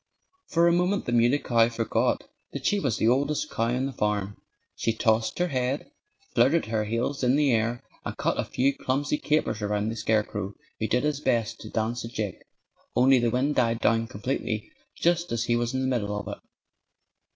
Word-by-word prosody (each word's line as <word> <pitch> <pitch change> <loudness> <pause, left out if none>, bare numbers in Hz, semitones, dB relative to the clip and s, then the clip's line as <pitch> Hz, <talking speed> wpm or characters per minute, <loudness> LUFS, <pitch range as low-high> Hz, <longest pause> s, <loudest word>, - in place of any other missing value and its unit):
For 170 0 +3
a - - +5
moment 180 +3 +1
the - - -2
Muley 120 +3 +4
Cow 115 -4 +3
forgot 115 -1 0 0.3
that - - -5
she 205 - +2
was 130 - 0
the 110 - +2
oldest 140 +5 +1
cow 115 - 0
on 125 +3 0
the 135 - -4
farm. 105 -2 -1 0.4
She 115 - 0
tossed 110 0 +1
her 180 0 +1
head, 130 0 -2 0.4
flirted 135 +8 +3
her 110 -1 -1
heels 120 +6 -2
in 125 +1 +4
the 145 -2 +3
air, 115 +1 0 0.2
and - - -5
cut - - 0
a - - +2
few 135 +2 +1
clumsy 145 +3 -1
capers 150 -7 0
around 105 +1 0
the 115 - -3
scarecrow, 105 -3 -1 0.2
who 110 - 0
did 125 +4 +1
his 150 -2 0
best 115 -7 0
to 110 - -8
dance 115 +2 -2
a - - -5
jig 105 -5 -4 0.5
only 130 +1 +5
the 120 -1 +2
wind 130 +5 +1
died 115 -4 +1
down 115 -1 +2
completely 110 0 -3 0.2
just 170 0 +1
as 115 -1 0
he 120 0 +1
was 120 0 0
in 130 - 0
the 130 - 0
middle 105 -1 -3
of 100 - -8
it. - - -7
120 Hz, 200 wpm, -26 LUFS, 110-135 Hz, 0.5 s, a